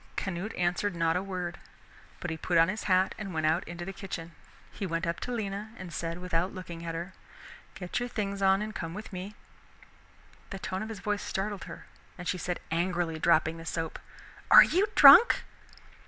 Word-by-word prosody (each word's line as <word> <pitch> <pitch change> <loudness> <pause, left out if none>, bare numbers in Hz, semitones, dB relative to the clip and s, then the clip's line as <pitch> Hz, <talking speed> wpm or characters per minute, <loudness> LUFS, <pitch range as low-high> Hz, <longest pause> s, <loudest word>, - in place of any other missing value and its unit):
Canute 190 +2 -4
answered 175 +2 0
not 165 -1 +1
a 180 - +1
word, 180 -3 -5 0.6
but 175 - -3
he - - -2
put 170 +2 0
on 165 +2 +5
his 215 +3 -4
hat 185 -1 +3
and 195 -5 -6
went 160 -1 0
out 160 +4 +2
into 175 +1 -6
the 195 - -6
kitchen. 170 -4 -7 0.4
He 195 - -5
went 165 +1 -2
up 170 0 -2
to 250 - -5
Lena 215 -1 -4
and 180 -2 -8
said 165 0 -3
without 180 +1 -2
looking 170 -3 -8
at 165 -1 -4
her, 175 +3 -5 0.6
"Get 180 +3 -3
your 245 0 -3
things 200 -3 -3
on 195 +1 +4
and 215 0 -6
come 165 -2 -5
with 210 0 -8
me!" 190 +3 -6 1.1
The 195 - -5
tones 190 0 -4
of 220 - -5
his 215 -3 -7
voice 205 0 -1
startled 200 0 -3
her, - - -10 0.3
and 180 -1 -7
she 185 - -1
said 180 +2 -3
angrily, 170 -1 -1
dropping 165 0 +3
the - - -8
soap, 165 0 -4 0.5
"Are - - +11
you 375 +6 +2
drunk?" 475 - +9
180 Hz, 200 wpm, -29 LUFS, 170-200 Hz, 1.1 s, Are